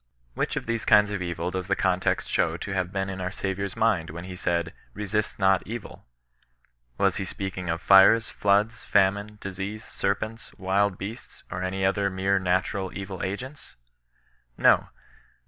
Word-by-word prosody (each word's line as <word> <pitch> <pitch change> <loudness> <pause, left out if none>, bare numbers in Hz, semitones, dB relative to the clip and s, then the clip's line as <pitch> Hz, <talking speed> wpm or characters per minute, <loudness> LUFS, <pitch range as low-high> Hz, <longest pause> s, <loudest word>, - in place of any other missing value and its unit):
Which - - -1
of - - -3
these 115 -1 -2
kinds 105 0 +5
of 100 -3 -3
evil 85 0 -3
does 95 0 -3
the 100 - +2
context 95 -1 +1
show - - +1
to 100 - -6
have 95 -1 -1
been 95 -1 -1
in 95 -1 -5
our 90 - -1
Saviour's 100 0 -3
mind 95 -8 +1
when 85 +3 -7
he 90 0 -7
said, 85 -2 -1
" - - -33
resist 105 0 -2
not 95 -1 +3
evilV^ 115 0 -7 1.0
Was - - +2
he - - -2
speaking 95 -2 -5
of 85 +2 -2
fires, 100 +4 +7
floods, 105 +3 +1
famine, 100 +2 +2
disease, 100 +3 -5
ser^^ecit^^^^X.^ 100 -2 -1
beasts, 105 +4 -8
or 90 - -3
any 95 +1 -1
other 100 +1 +2
mere 95 +1 +1
natural 95 +1 0
ml 95 -1 -6
ctgeuts*^ 125 - -6 0.8
'^q, - - -11
^^)aea. - - +6
95 Hz, 165 wpm, -26 LUFS, 95-100 Hz, 1.0 s, fires